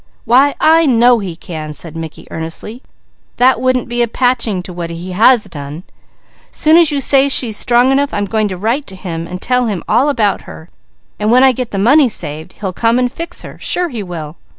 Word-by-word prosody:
"Why 265 +5 +4
I 325 0 +4
know 240 -1 +4
he 185 -5 -5
can!" 155 -3 -7
said 160 +2 -7
Mickey 160 -1 -8
earnestly. 165 +9 -6 0.6
"That 250 -1 +3
wouldn't 255 -1 0
be 240 0 -1
a 240 - +2
patching 230 -6 0
to 180 - -9
what 170 -1 -5
he 170 +2 -7
has 220 +5 +4
done! 145 +3 -8 0.7
Soon 310 +1 +3
as 335 -2 +5
you 290 -2 -1
say 275 0 +3
she 255 -3 +2
is 210 - -2
strong 245 +2 +3
enough, 280 +1 +1
I'm 205 - -2
going 215 +1 -1
to 185 -2 -5
write 235 +9 -2
to 190 - -8
him 170 -3 -6
and 180 +1 -7
tell 250 +2 0
him 200 -5 -3
all 275 +4 +2
about 210 -8 0
her, 160 - -12 0.5
and 210 +1 0
when 250 +2 +5
I 265 - +6
get 250 -1 -4
the 200 - -5
money 255 +7 +4
saved, 160 -3 -4
he'll 190 -3 -5
come 230 +5 +1
and 250 -1 0
fix 335 +4 -6
her. - - -11
Sure 355 -1 -1
he 235 -6 -5
will!" 165 -4 -7
225 Hz, 220 wpm, -15 LUFS, 180-255 Hz, 0.7 s, I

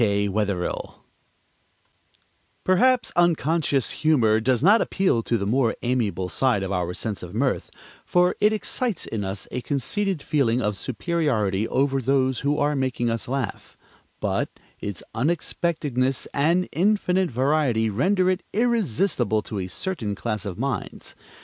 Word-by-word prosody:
K. 100 -2 +2
WETHERILL 100 -3 -2 1.7
Perhaps 250 +7 +3
unconscious 165 -5 +2
humor 120 -9 +4
does 125 +3 +1
not 210 +6 +6
appeal 185 - +1
to 115 +1 0
the 100 - -2
more 120 +2 +1
amiable 115 -7 0
side 105 +3 +1
of 95 - -3
our 90 -2 -1
sense 105 -3 -3
of 90 +2 -8
mirth, 130 +3 0 0.3
for 180 0 +2
it 210 - +5
excites 220 0 -1
in 110 -2 -3
us 95 -2 -4
a 125 - -3
conceited 150 - -1
feeling 130 -6 +1
of 105 -4 -1
superiority 115 - -1
over 135 0 +1
those 130 0 +1
who 145 +1 0
are 145 +1 +1
making 130 -3 0
us 115 - -3
laugh, 135 +1 -4 0.4
but - - -1 0.3
its 100 -3 -5
unexpectedness 140 -1 0
and 170 +6 +2
infinite 190 -1 +2
variety 130 -3 +1
render 185 - +2
it 185 0 +1
irresistible 190 - +1
to 105 - -5
a 90 - -3
certain 115 - -3
class 105 -1 -3
of 95 -3 -5
minds. 135 +1 -4
130 Hz, 140 wpm, -24 LUFS, 110-170 Hz, 1.7 s, not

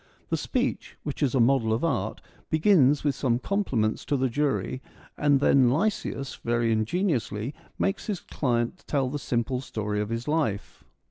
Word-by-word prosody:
The - - +2
speech, - - -2
which 145 0 -5
is 140 -2 +2
a - - +3
model 120 -2 +3
of 110 +6 0
art, 165 - -1 0.3
begins 155 -4 +4
with 145 -2 +2
some 125 -3 +1
compliments 125 - 0
to 145 - +1
the 130 0 +1
jury, 130 -1 -1 0.3
and 145 -2 +3
then 135 -3 +5
Lysias, 145 -4 -1
very 120 -1 +1
ingeniously, 115 - 0 0.2
makes 195 +4 -1
his 200 -5 -2
client 120 +4 -1
tell 135 -3 0
the 145 - -3
simple 125 0 -1
story 105 -4 -3
of 105 - -3
his 115 +1 -3
life. 150 -10 -1
130 Hz, 160 wpm, -27 LUFS, 115-150 Hz, 0.3 s, then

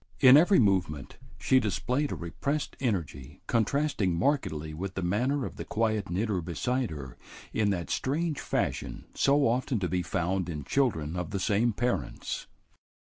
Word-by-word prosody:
In 130 -1 +9
every 175 +6 +6
movement 90 - +1 0.2
she 130 - +3
displayed 125 +6 -1
a - - -2
repressed 140 - -3
energy 85 - -3
contrasting 115 - +1
markedly 80 - 0
with 95 +4 -5
the 95 - -2
manner 125 +9 0
of - - -7
the - - -4
quiet 110 -3 -1
knitter 95 +1 0
beside 125 - -1
her 65 -5 -7 0.4
in 105 -2 +2
that 90 -4 -2
strange 155 +3 -1
fashion - - -2
so 140 +1 +3
often 125 +2 0
to 95 -3 -1
be 90 0 0
found 90 0 -1
in 75 -4 -4
children 80 - 0
of 90 -2 -3
the 100 - -2
same 110 +4 +2
parents. 120 +4 -2
105 Hz, 155 wpm, -29 LUFS, 85-130 Hz, 0.4 s, In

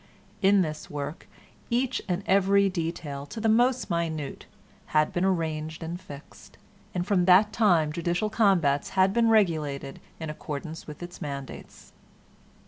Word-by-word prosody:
In 195 -1 +5
this 155 -2 -6
work 145 +2 -6 0.4
each 250 +1 0
and 180 +2 -1
every 200 +1 +4
detail, 160 -5 -4
to 220 - -7
the 225 - 0
most 245 +2 +2
minute, 160 -4 -3 0.5
had 155 0 +3
been 175 - 0
arranged 160 -3 -1
and 170 +3 -5
fixed, 145 -6 -13 0.4
and 175 -1 -1
from 185 -3 +2
that 195 +4 +5
time 170 -9 +3
judicial 175 +6 -1
combats 175 -11 +2
had 190 +1 +4
been 230 0 +3
regulated 155 -10 +1 0.2
in 160 -2 -4
accordance 155 +2 -7
with 150 +2 -8
its 175 0 -9
mandates. 140 -2 -8
175 Hz, 140 wpm, -27 LUFS, 155-200 Hz, 0.5 s, In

